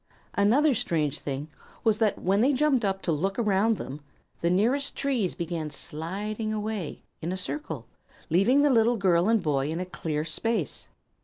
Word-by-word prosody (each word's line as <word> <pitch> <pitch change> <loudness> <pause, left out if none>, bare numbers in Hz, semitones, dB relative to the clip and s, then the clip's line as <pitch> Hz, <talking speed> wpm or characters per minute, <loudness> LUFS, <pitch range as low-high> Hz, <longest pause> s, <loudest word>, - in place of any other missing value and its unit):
Another 260 +9 +4
strange 155 - 0
thing 140 +1 -4 0.4
was 220 -2 +3
that 220 -3 +2
when 195 +3 +2
they 270 +4 +4
jumped 270 -3 +2
up 195 -1 -1
to 170 - 0
look 190 +6 -1
around 215 -1 +2
them 140 +3 -7 0.4
the 170 - +2
nearest 240 +10 +1
trees 250 -10 0
began 165 -2 -3
sliding 195 +10 -4
away, 215 -5 -3 0.2
in 165 - -2
a 185 - -2
circle, 295 +11 -4 0.4
leaving 200 - +4
the 290 - +4
little 235 0 +4
girl 185 -1 +3
and 225 -4 +3
boy 140 -2 +1
in 165 +2 -2
a 185 - -2
clear 155 -4 -3
space. 180 - -2
195 Hz, 170 wpm, -27 LUFS, 165-230 Hz, 0.4 s, Another